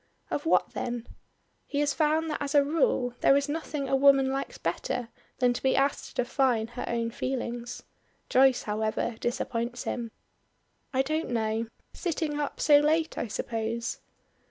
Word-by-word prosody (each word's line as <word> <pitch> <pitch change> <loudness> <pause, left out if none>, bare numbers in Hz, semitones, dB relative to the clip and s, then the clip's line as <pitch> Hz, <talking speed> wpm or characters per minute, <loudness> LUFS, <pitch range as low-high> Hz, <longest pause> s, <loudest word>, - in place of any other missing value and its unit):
"Of 290 - -2
what - - +3
then?" 240 -1 -4 0.6
He 285 - -2
has 290 -1 +2
found 315 +1 +1
that - - -3
as 285 +1 -2
a 285 - +7
rule 280 -4 +1
there 275 - +6
is 280 0 0
nothing 295 -2 -3
a 270 - +2
woman 270 -1 +5
likes 270 +1 -3
better 245 -2 -2 0.3
than 245 -1 +3
to - - -5
be 265 - +2
asked 275 +1 +1
to - - +2
define 245 -3 +1
her 245 - -5
own 230 -1 -1
feelings, 240 -1 -4 0.4
Joyce, 265 0 +4
however, 215 +2 -1
disappoints 240 -1 -2
him. 235 -2 -3 0.8
"I 265 0 +2
don't 310 +4 -2
know. 225 -1 0 0.3
Sitting 320 -4 -2
up 290 - -3
so 290 -1 +6
late 315 +2 +1
I - - -2
suppose." 230 +2 -3
265 Hz, 160 wpm, -28 LUFS, 235-290 Hz, 0.8 s, a